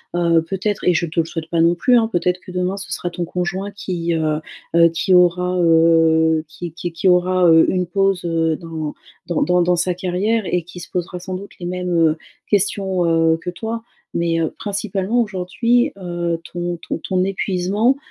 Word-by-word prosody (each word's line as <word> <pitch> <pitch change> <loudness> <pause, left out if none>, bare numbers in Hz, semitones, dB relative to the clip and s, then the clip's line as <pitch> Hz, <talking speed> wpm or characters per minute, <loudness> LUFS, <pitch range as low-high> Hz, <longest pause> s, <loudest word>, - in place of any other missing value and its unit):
heu, 170 -2 +3
peut-être 195 +4 -3
et 180 - +4
je 170 +1 0
te 165 +2 -2
le 165 - +2
souhaite 165 -1 -6
pas 165 -1 +1
non 170 +1 +4
plus, 245 +8 +3
hein, 225 -1 +3
peut-être 180 -3 0
que 185 - -12
demain 180 +2 -1
ce 195 - -8
sera 175 - -3
ton 175 0 -4
conjoint 180 +3 -3
qui, 175 -4 -3
heu, 155 -2 0 0.4
heu, 170 0 +6
qui 165 +3 +1
aura, 180 +1 +3
heu, 165 -1 +4
qui 170 +2 -7
qui 175 +1 -5
qui 165 +3 -1
aura, 180 0 +4
heu, 160 0 +6
une 180 -1 0
pause, 195 0 +1
heu, 165 -1 +1
dans 160 -3 -5 0.3
dans 170 - -1
dans 180 0 +3
dans 180 +1 +2
sa 175 +1 0
carrière 190 +5 0
et 180 -1 0
qui 180 +2 -11
se 170 - -10
posera 180 0 -3
sans 185 +1 -7
doute 195 +2 -7
les 175 - -6
mêmes, 180 0 -3
heu, 165 -2 +3 0.3
questions, 195 -2 +1 0.3
heu, - - 0
que 170 +2 -6
toi. 225 +5 -5 0.3
Mais, 170 -1 0
heu, 160 - -1
principalement 205 +2 -1
aujourd'hui, 230 +6 +1
heu, 175 -2 -3
ton 175 0 -3
ton - - -2
ton 185 -1 -1
épuisement, 195 +5 +1
180 Hz, 200 wpm, -20 LUFS, 170-190 Hz, 0.4 s, heu